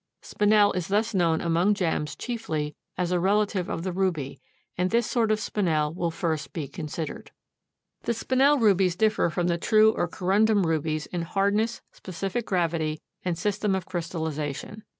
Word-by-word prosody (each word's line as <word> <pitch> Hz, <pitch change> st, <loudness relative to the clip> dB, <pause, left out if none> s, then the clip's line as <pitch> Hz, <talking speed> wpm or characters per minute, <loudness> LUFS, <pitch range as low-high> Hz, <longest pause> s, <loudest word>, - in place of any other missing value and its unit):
Spinel 210 Hz, 0 st, +3 dB
is 180 Hz, -2 st, -2 dB
thus 220 Hz, +3 st, +1 dB
known 170 Hz, -4 st, +2 dB
among 175 Hz, +5 st, +2 dB
gems 160 Hz, -5 st, -1 dB
chiefly 155 Hz, -11 st, -3 dB, 0.2 s
as 180 Hz, 0 st, -1 dB
a 180 Hz, -, +2 dB
relative 200 Hz, 0 st, +1 dB
of 165 Hz, -, -3 dB
the 185 Hz, -, -2 dB
ruby, 175 Hz, -7 st, -2 dB, 0.3 s
and 180 Hz, +1 st, 0 dB
this 235 Hz, +2 st, +2 dB
sort 230 Hz, -2 st, +1 dB
of 215 Hz, 0 st, +2 dB
Spinel 160 Hz, -9 st, 0 dB
will 170 Hz, 0 st, -1 dB
first 160 Hz, -3 st, -3 dB
be 155 Hz, -5 st, -4 dB
considered. 155 Hz, +1 st, -6 dB, 0.8 s
The 235 Hz, -, 0 dB
Spinel 265 Hz, +5 st, +3 dB
rubies 195 Hz, -5 st, +3 dB
differ 215 Hz, -2 st, +2 dB
from 175 Hz, +2 st, -1 dB
the 170 Hz, -1 st, 0 dB
true 215 Hz, +4 st, +5 dB
or 175 Hz, -, -1 dB
corundum 200 Hz, +3 st, +2 dB
rubies 155 Hz, -1 st, -1 dB
in 175 Hz, -, -4 dB
hardness, 200 Hz, +6 st, 0 dB
specific 195 Hz, +5 st, -4 dB
gravity 165 Hz, -4 st, 0 dB, 0.2 s
and 175 Hz, -2 st, -1 dB
system 205 Hz, +1 st, 0 dB
of 190 Hz, -2 st, -3 dB
crystallization. 160 Hz, +2 st, -4 dB
180 Hz, 160 wpm, -26 LUFS, 165-210 Hz, 0.8 s, true